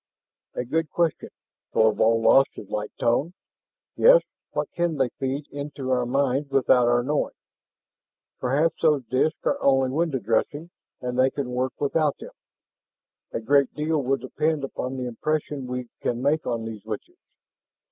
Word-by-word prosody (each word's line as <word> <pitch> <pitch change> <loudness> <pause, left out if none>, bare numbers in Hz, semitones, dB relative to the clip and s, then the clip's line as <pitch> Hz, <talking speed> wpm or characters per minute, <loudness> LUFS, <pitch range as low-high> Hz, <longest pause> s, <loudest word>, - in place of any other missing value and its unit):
"A 125 - -2
good 160 +5 -1
question." 170 -3 -1 0.4
Thorvald 110 +1 +3
lost 135 0 +6
his 100 - -10
light 105 0 -3
tone. 140 +9 +1 0.6
"Yes, - - +7 0.3
what - - -3
can 170 -3 -1
they 130 -2 +2
feed 135 +1 -2
into 140 -2 -5
our 125 -1 +1
minds 135 +2 0
without 130 -2 +4
our 120 0 +3
knowing? 145 +3 -1 1.0
Perhaps 145 +6 +1
those 150 -5 +3
disks 135 +7 +1
are - - 0
only 135 -1 +3
window 155 -1 0
dressing, 145 - -1 0.3
and 125 0 -3
they 130 +1 +5
can 135 -2 -4
work 130 +1 -2
without 145 +1 +1
them. - - -10 1.0
A - - -2
great 140 +4 +2
deal 155 0 0
will 135 +1 +1
depend 150 +4 -1
upon 130 -1 -4
the 125 - -3
impression 145 +2 -2
we 125 -1 -4
can 120 - -1
make 145 +4 0
on 115 -1 -2
these 110 -2 -7
witches." 215 - -7
135 Hz, 155 wpm, -25 LUFS, 125-150 Hz, 1.0 s, Yes